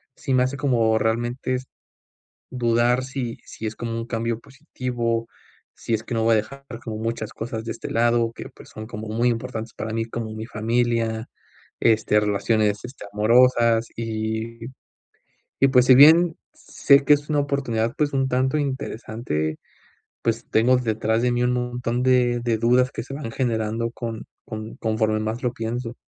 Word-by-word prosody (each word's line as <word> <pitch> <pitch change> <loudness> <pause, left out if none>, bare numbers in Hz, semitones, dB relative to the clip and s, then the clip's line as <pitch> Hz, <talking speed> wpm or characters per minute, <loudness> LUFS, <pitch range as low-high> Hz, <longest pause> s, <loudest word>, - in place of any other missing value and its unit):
sí 135 - -3
me 125 0 +4
hace 130 +2 -2
como 115 -5 +2
realmente 120 +3 -1
s 130 +1 -5 0.9
dudar 120 0 +2
si 130 -3 -4
si 110 - -7
es 110 - -3
como 115 -1 -4
un 115 - -4
cambio 115 -1 -2
positivo, 125 -4 -3 0.5
si 115 - -3
es 110 - -2
que 120 - -4
no 115 - +1
voy 115 0 +4
a - - +4
dejar 140 +6 -4 0.2
como 110 -2 -4
muchas 115 0 -3
cosas 115 0 -5
de 115 - -3
este - - -7
lado 115 0 +2
que, - - -8
pues, - - -16
son 110 0 -8
como 110 -1 -7
muy 115 +3 +1
importantes 115 -1 -4
para 110 0 -5
mí, 115 0 -1
como 115 -1 -5
mi 110 +1 -6
familia, 115 0 0 0.5
este, 110 -1 +3
relaciones, 105 +1 +1
este, 125 -3 -9
amorosas 115 +1 +4
y 110 0 -3 1.0
y, 135 - +6
pues, 125 -1 +4
si 130 - +8
bien 160 +5 +7 0.2
sé 140 0 +3
que 150 - +5
es 145 +1 -4
una 145 -1 +2
oportunidad, 120 -5 -1
pues, 150 -1 0
un 135 -1 +1
tanto 130 +3 +1
interesante, 110 - -3 0.6
pues, 115 0 -1
tengo 120 +3 +4
detrás 110 -1 0
de 125 0 +2
mí 120 0 0
un 125 0 +2
montón 125 0 -2
de 125 -2 +3
de 115 -2 +1
dudas 125 +3 +3
que - - -5
se 135 - -9
me 145 - -6
van 115 - -5
generando 115 -2 -1
con 115 -2 -6 0.2
con 110 0 -7
conforme 110 -1 0
más 110 +3 -3
lo 120 0 0
pienso. 115 +1 -4
115 Hz, 175 wpm, -23 LUFS, 110-125 Hz, 1.0 s, si